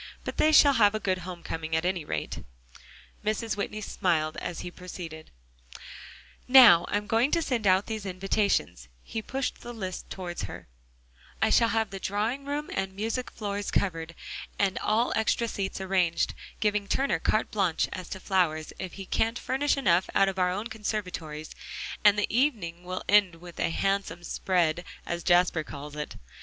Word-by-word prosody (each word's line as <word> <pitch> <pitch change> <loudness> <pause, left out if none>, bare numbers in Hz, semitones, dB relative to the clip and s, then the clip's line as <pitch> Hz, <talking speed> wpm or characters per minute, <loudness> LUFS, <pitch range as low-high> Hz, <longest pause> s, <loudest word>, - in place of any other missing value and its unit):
But - - -5
they 310 - +4
shall 290 -2 +7
have 215 -4 +4
a - - 0
good 185 -3 0
home 180 -1 -8
coming, 160 0 -3
at 160 +1 0
any 180 -3 0
rate." - - -4 0.8
Mrs. 215 +1 -1
Whitney 210 +1 -3
smiled, 160 -6 0
and 175 -2 -4
he 175 - -6
proceeded: 170 -3 -8 1.2
"Now 240 -10 +9
I'm 205 0 0
going 230 +5 +2
to 335 +2 +2
send 235 -8 0
out 190 +1 +4
these 220 -2 -4
invitations" 190 - 0 0.2
he 225 - -4
pushed 265 +4 -3
the 240 - -7
list 185 -4 -5
toward 180 -2 -5
her 95 - -7 0.7
"I - - +2
shall 230 - +5
have 220 -3 0
the 195 - -5
drawing 220 +9 -1
room 290 +1 -3
and 190 0 -2
music 225 +5 -2
room - - -26
floors 205 -2 -3
covered, 165 -3 -1 0.4
and 195 -2 +1
all 225 +3 +1
extra 220 +1 +1
seats 195 -4 -3
arranged, 185 -3 +1 0.3
give 210 -2 +2 0.2
Turner 275 +5 +1
carte 215 - +1
blanche 190 -6 +1
as 185 -2 -7
to 190 - -5
flowers, 175 -5 0
if 185 -1 -5
he 195 - -7
can't 225 +5 0
furnish 275 +3 0
enough 180 -8 +3
out 195 - +5
of 190 0 -5
our 180 0 +3
own 200 +4 -2
conservatories 180 -9 -4 0.5
and 205 -1 +6
the 205 - +2
evening 205 - 0
will 185 +1 -4
end 200 -4 +5
with 175 +1 -12
a - - +1
handsome 195 -1 -1
'spread,' 175 -2 0 0.2
as 170 0 -3
Jasper 175 -2 +3
calls 145 0 -8
it. 150 0 -5
195 Hz, 175 wpm, -28 LUFS, 175-220 Hz, 1.2 s, Now